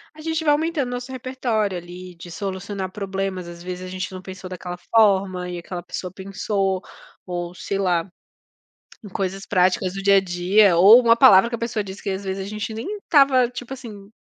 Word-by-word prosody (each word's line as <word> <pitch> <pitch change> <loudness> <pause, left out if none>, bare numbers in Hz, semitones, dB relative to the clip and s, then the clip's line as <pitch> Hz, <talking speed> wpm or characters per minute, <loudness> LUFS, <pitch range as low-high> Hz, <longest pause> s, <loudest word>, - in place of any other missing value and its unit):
a 310 - -12
gente 320 0 -2
vai 295 -2 +4
aumentando 310 -3 0
o - - -6
nosso 245 +1 -5
repertório 240 -6 -2
ali 180 +1 -10
de 170 +1 -11
solucionar 190 +1 -5
problemas, 195 -2 -4
às 170 0 -10
vezes 180 0 -6
a - - -7
gente 185 +1 -5
não 185 - -7
pensou 185 0 -9
daquela 180 -1 -6
forma 190 -3 +2
e 175 - -5
aquela 175 +1 -6
pessoa 180 0 -6
pensou 195 0 -2 0.4
ou, 175 -1 -4
sei 195 +3 -3
lá, 180 -3 +1 1.0
em - - -8
coisas 195 0 -3
práticas 185 +1 +2
do 195 - -5
dia 200 0 +5
a - - +6
dia 185 +1 +3
ou 205 +8 +9
uma 230 -2 +5
palavra 235 -3 +7
que - - -5
a - - -2
pessoa 225 -3 -2
diz 190 0 -9
que - - -6
às 190 +1 -4
vezes 190 0 -3
a 195 - -7
gente 215 +1 -4
nem 385 - -5
estava, 275 -8 +4
tipo 250 +1 -8
assim, 215 -6 -11
195 Hz, 205 wpm, -22 LUFS, 185-230 Hz, 1.0 s, ou